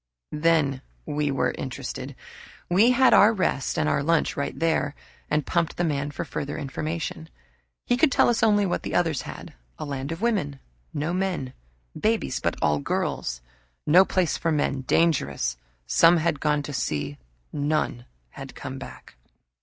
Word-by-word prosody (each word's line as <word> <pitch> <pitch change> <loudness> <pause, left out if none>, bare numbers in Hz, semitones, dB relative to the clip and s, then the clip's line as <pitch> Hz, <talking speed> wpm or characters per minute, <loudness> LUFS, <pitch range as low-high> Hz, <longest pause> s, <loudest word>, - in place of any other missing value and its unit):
Then 150 -4 +2 0.2
we 150 -1 -1
were 135 -2 0
interested. - - -5 0.6
We 205 +7 +5
had 255 +1 +5
our 210 - +7
rest 185 - -1
and 75 - +1 0.2
lunch 165 -1 +2
right 140 - -3
there 160 -3 0 0.3
and 150 -2 +1
pumped 170 0 0
the 175 - +1
man 145 -3 -1
for 145 - -5
further 140 +2 -4
information. 155 - -4 0.6
He 245 - +2
could 285 +2 +4
tell - - +4
us 235 -1 +2
only 205 -2 +4
what 180 - -1
the - - -4
others 165 -5 +1
had - - -9 0.2
a - - -5
land 140 0 -4
of 165 - -4
women 190 - 0 0.3
no 150 +4 -2
men 180 -9 -2 0.4
babies, 225 +1 0
but - - -1
all 75 -1 +2
girls. - - -2 0.4
No 175 +5 +7
place 185 -3 0
for 165 - 0
men 145 -3 0
dangerous. 130 - +1 0.3
Some 165 - +5
had 160 -3 0
gone 150 -1 +1
to 145 - -6
see 75 - -2 0.3
none 145 -4 -1 0.3
had - - -10
come - - -6
back. - - -11
150 Hz, 160 wpm, -25 LUFS, 140-175 Hz, 0.6 s, our